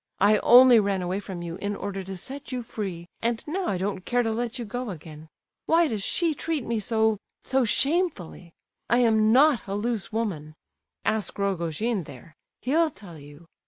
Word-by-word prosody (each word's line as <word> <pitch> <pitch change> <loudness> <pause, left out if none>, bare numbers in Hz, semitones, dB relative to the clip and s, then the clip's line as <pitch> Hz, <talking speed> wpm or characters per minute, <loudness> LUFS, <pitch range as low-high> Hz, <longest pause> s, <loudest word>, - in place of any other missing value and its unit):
I 210 +2 +5
only 250 -1 +8
ran 200 -3 0
away 180 +2 -2
from 190 -4 -7
you 170 0 -5
in 205 +1 -3
order 200 -1 -4
to 190 0 -6
set 275 +9 -9
you 250 -1 -3
free, 190 -7 -6
and 230 0 -1
now 365 +4 -2
I 190 - 0
don't 190 0 -3
care 245 +3 +1
to 225 - -1
let 235 +2 -3
you 240 - -5
go 245 +3 -4
again. 155 -3 -10 0.4
Why 330 +1 +4
does 220 -7 -3
she 330 - 0
treat 305 -2 -3
me 230 -1 -1
so—so 220 +4 0
shamefully? 270 - 0 0.4
I 240 - +4
am 220 -3 +4
not 270 -1 +4
a 195 - -3
loose 225 0 -2
woman—ask 155 - -4
Rogojin 195 +1 -1
there! 145 +5 -13 0.3
He'll 315 +7 +2
tell 180 - -13
you. 145 +3 -14
215 Hz, 175 wpm, -26 LUFS, 185-245 Hz, 0.4 s, only